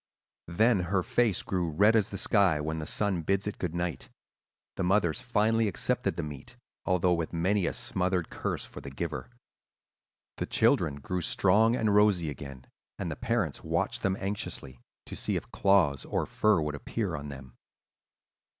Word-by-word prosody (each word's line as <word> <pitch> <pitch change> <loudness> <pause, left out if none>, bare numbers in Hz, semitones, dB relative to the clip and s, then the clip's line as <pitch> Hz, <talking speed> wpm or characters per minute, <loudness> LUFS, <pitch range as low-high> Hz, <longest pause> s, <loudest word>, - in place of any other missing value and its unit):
"Then 110 +5 +3
her 90 +1 0
face 115 -2 +1
grew 90 -3 -1
red 100 +8 +4
as 110 -3 +3
the 100 - -5
sky 95 -6 +3
when 80 +1 -3
the 75 - -5
sun 100 -5 0
bids 100 +4 0
it 105 - -5
good 85 -2 -3
night. 85 -2 -3 0.7
The - - -2
mothers 90 -1 +2
finally 115 -2 +2
accepted 95 - 0
the - - -3
meat, 75 - -9 0.3
although 90 -1 +3
with 85 -1 -2
many 90 +3 +1
a - - -1
smothered 90 -2 -1
curse - - -3
for - - -10
the 70 - -7
giver. 70 -1 -5 1.1
The - - -3
children 70 - +2
grew 90 +5 -2
strong 110 +7 +3
and 110 -4 +1
rosy 100 -7 +3
again; 70 -2 -9 0.3
and - - -3
the - - -4
parents 110 -10 -1
watched - - -1
them 95 0 0
anxiously, 95 -10 -5 0.3
to - - -7
see - - -2
if - - -5
claws 90 -9 +3
or - - -1
fur 105 -4 +2
would 75 -1 -2
appear 75 - -3
on 75 0 -6
them. 65 -3 -10
90 Hz, 170 wpm, -29 LUFS, 80-105 Hz, 1.1 s, red